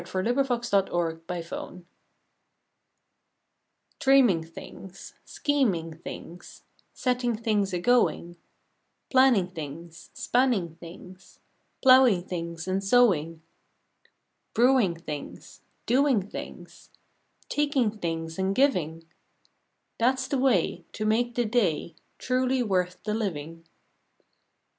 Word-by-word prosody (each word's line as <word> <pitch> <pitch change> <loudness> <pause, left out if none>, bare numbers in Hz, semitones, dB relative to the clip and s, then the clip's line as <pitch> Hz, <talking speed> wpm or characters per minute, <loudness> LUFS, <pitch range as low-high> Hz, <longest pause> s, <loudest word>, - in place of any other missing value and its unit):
November 240 +9 0
Twenty 245 -3 -2
sixth 175 -6 0 0.3
ACTION 180 -1 -7 2.1
TVREAMING 265 - +4
things, 190 +2 -11
Scheming 200 - -1
things, 175 +1 -10 0.3
Setting 250 -2 -1
things 210 -3 0
a 180 - -1
going; 175 -5 +1 0.8
Planning 255 -9 +4
things, 165 +1 -9
Spanning 240 -10 +1
things, 180 +2 -13 0.5
Plowing 255 -8 +6
things 170 -2 -6
and 190 +1 -1
sowing, 175 -8 +2 1.1
Brewing 235 -6 +4
things, 150 -3 -9 0.2
Doing 255 -6 +2
things, - - -10 0.6
Taking 285 -6 +1
things 165 -1 -4
and 190 +1 0
giving 165 - +1 1.0
That 245 +3 +4
s 260 0 -4
the 275 -2 -1
way 205 -9 +1
To 215 - -4
make 235 +2 +1
the 240 - +1
day 200 -8 0 0.2
Truly 255 0 0
worth 180 -4 -1
the 210 - -2
living. 165 -6 -4
195 Hz, 95 wpm, -26 LUFS, 170-250 Hz, 2.1 s, Plowing